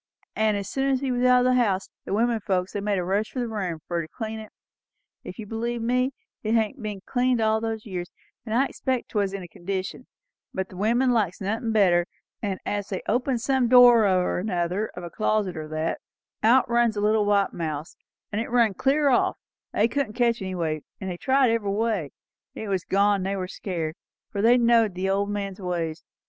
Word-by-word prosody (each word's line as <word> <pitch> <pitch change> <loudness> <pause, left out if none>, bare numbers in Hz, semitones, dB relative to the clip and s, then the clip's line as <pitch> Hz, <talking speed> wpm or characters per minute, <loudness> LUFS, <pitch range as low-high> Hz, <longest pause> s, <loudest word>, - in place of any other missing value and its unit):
An' 215 -1 +2
as 200 -1 -3
soon 270 0 0
as 265 -1 +1
he 270 -2 -1
was 245 0 0
out 250 0 +6
o' 250 - +3
the - - +4
house, 205 -7 +1
his - - -3
women 230 +1 +2
folks, 185 -2 -1
they 205 - -2
made 205 -1 0
a 180 - 0
rush 200 +4 0
for 260 - -3
his 240 - -1
room, 185 -7 -3
fur 170 -1 -1
to 160 - -7
clean 220 +5 -5
it; 215 -1 -9
for, - - -19
if - - -9
you'll 220 -3 -7
believe 235 +1 -2
me, 250 +3 +1 0.3
it 220 +1 0
hadn't 230 +4 0
been 210 -3 -5
cleaned 250 -1 +1
all 220 0 +2
those 225 -1 -3
years; 180 -3 -5 0.3
and 220 -1 -3
I 265 +3 +4
expect 260 -2 -2
'twas 200 -3 0
in 195 -1 -5
a - - -8
condition; 190 +7 -5 0.5
but 190 0 -2
the - - -12
women 235 +6 +2
likes 205 -7 +1
nothin' 220 +4 -2
better; 180 -5 +4 0.3
and 195 -3 -2
as 205 -1 -2
they 190 - -4
opened 245 +1 0
some 265 -1 +2
door 240 -3 +7
or 185 -2 +1
other, 180 +4 0
of 180 - -7
a 170 - -7
closet 215 -4 0
or 155 -1 -5
that, 155 +1 -2 0.4
out 245 +4 +5
runs 235 -2 +2
a - - 0
little 210 0 +3
white 200 -1 +2
mouse, 155 -1 -4 0.4
and 210 +1 -1
it 230 - -5
run 235 -4 +3
clear 280 +7 +2
off; 250 - +2 0.3
they 215 - +3
couldn't 265 -3 -2
catch 235 -1 +1
it - - -3
any 185 0 -4
way, 155 -3 -2 0.2
and 190 -2 -4
they 175 - -5
tried 265 +2 +3
every 225 -3 0
way. 205 -6 0 0.5
It 220 - -5
was 190 -2 -1
gone, 200 +1 +3
and 190 - -3
they 200 - -1
were 185 -1 -3
scared, 170 -5 -4 0.4
for 200 - -2
they 235 +3 +6
knowed 230 -4 +3
the 190 +1 0
old 200 +1 +1
gentleman's 200 -2 -4
ways. 170 -3 -3
210 Hz, 225 wpm, -25 LUFS, 190-235 Hz, 0.5 s, door